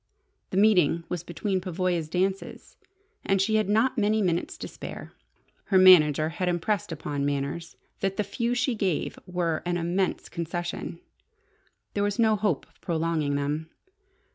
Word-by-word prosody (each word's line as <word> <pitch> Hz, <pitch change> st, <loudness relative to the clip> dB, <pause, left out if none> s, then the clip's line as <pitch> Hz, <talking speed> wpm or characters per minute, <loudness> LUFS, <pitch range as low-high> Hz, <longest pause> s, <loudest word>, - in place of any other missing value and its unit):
The 185 Hz, -, -3 dB
meeting 180 Hz, -6 st, +4 dB
was 175 Hz, -2 st, -3 dB
between 185 Hz, +2 st, -2 dB
Pavoya's 180 Hz, -3 st, -1 dB
dances, 190 Hz, +3 st, -2 dB, 0.5 s
and 195 Hz, 0 st, +1 dB
she 215 Hz, +3 st, +2 dB
had 215 Hz, -2 st, 0 dB
not 235 Hz, +4 st, +2 dB
many 215 Hz, +1 st, +2 dB
minutes 175 Hz, -2 st, -1 dB
to -, -, -6 dB
spare. -, -, -9 dB, 0.5 s
Her 190 Hz, -, +3 dB
manager 155 Hz, -5 st, +7 dB
had 180 Hz, +2 st, -2 dB
impressed 175 Hz, +2 st, -1 dB
upon 145 Hz, -2 st, -3 dB
Manners 145 Hz, +4 st, -3 dB, 0.2 s
that 195 Hz, 0 st, -1 dB
the 210 Hz, -, +1 dB
few 235 Hz, +4 st, -1 dB
she 250 Hz, +1 st, +1 dB
gave 195 Hz, -7 st, -1 dB
were 175 Hz, -3 st, -1 dB
an 175 Hz, 0 st, -1 dB
immense 175 Hz, +3 st, -1 dB
concession. 170 Hz, 0 st, -4 dB, 0.9 s
There 200 Hz, -, -1 dB
was 205 Hz, +1 st, 0 dB
no 220 Hz, -2 st, +4 dB
hope 205 Hz, -8 st, 0 dB
of -, -, -32 dB
prolonging 160 Hz, -4 st, 0 dB
them. 145 Hz, +3 st, -2 dB
180 Hz, 150 wpm, -27 LUFS, 165-200 Hz, 0.9 s, manager